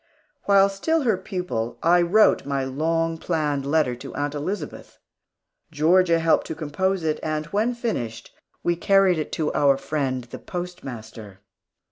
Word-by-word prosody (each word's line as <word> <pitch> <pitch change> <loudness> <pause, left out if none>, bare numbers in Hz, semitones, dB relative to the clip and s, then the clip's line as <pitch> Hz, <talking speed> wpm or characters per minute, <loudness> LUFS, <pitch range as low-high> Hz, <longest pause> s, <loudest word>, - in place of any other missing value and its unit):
While 200 -1 +5
still 310 +11 0
her 225 -5 +3
pupil, 180 - -4
I 175 +1 +5
wrote 205 +6 +4
my 140 -1 -2
long 165 +4 -1
planned 150 -5 -1
letter 145 -4 +2
to - - -9
Aunt 145 0 -2
Elizabeth. 150 +2 -5 0.7
Georgia 165 +3 +4
helped 165 -1 +2
to - - -5
compose 175 +5 -1
it, 155 -1 0
and 155 0 -2
when 225 +4 +1
finished, 125 - -4 0.3
we 175 - +1
carried 190 -1 +3
it 155 - -4
to 155 -2 -1
our 140 -1 +3
friend, 135 -4 -2
the 120 - -10
postmaster. 115 - -8
160 Hz, 145 wpm, -24 LUFS, 140-185 Hz, 0.7 s, While